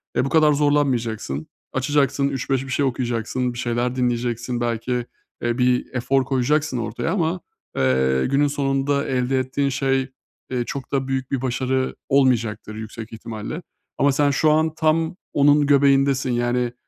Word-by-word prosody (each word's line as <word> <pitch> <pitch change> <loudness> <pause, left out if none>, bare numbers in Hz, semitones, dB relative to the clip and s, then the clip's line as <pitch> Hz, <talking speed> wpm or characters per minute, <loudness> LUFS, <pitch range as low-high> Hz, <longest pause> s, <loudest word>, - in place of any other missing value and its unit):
e, - - +2
bu - - -2
kadar 155 -1 +4
zorlanmayacaksın. 125 - 0 0.3
Açacaksın, 140 0 +1
3-5 135 -1 -1
bir - - -9
şey 140 +2 +1
okuyacaksın, 125 -1 -1
bir - - -9
şeyler 120 +1 -1
dinleyeceksin. 120 -1 -1
Belki, 120 +1 -2 0.5
eee, 120 0 -1
bir 125 -1 +2
efor 130 +1 +1
koyacaksın 135 +2 +1
ortaya 115 +7 -2
ama, 175 -1 0 0.4
eee, 65 0 +2
günün 140 +2 +2
sonunda 140 0 0
elde 130 0 0
ettiğin 135 +2 -1
şey, 135 -1 0 0.4
eee, 125 -1 0
çok 135 +1 -6
da 135 -1 0
büyük 130 -1 -2
bir 135 -3 -1
başarı 130 0 -1
olmayacaktır 115 -6 +1
yüksek 110 +1 -8
ihtimalle. 115 +8 -6 0.4
Ama 140 +1 +3
sen 145 +1 +2
şu 155 +2 +3
an 155 +1 +2
tam 160 +1 +1 0.2
onun 145 +1 +4
göbeğindesin. 140 -2 +3
Yani, 120 0 0
130 Hz, 150 wpm, -22 LUFS, 120-140 Hz, 0.5 s, kadar